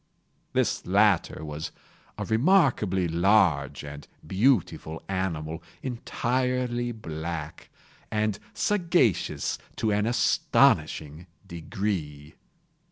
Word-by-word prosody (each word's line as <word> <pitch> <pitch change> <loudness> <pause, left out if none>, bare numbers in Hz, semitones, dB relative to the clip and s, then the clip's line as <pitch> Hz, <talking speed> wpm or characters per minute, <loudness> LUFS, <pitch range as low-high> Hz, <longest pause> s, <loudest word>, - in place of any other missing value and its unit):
This - - +1
latter 100 -4 +2
was 75 +2 -5 0.5
a - - -3
remarkably 115 - +3
large 85 -6 +2
and 70 0 -9 0.2
beautiful 95 - +1
animal, 80 -4 -3 0.2
entirely 125 0 -1
black, 80 -6 -6 0.4
and 105 -1 0 0.2
sagacious 175 - +1 0.2
to 110 - 0
an 105 +1 +1
astonishing 85 -8 +2 0.2
degree. 85 -5 -4
95 Hz, 80 wpm, -27 LUFS, 80-120 Hz, 0.5 s, remarkably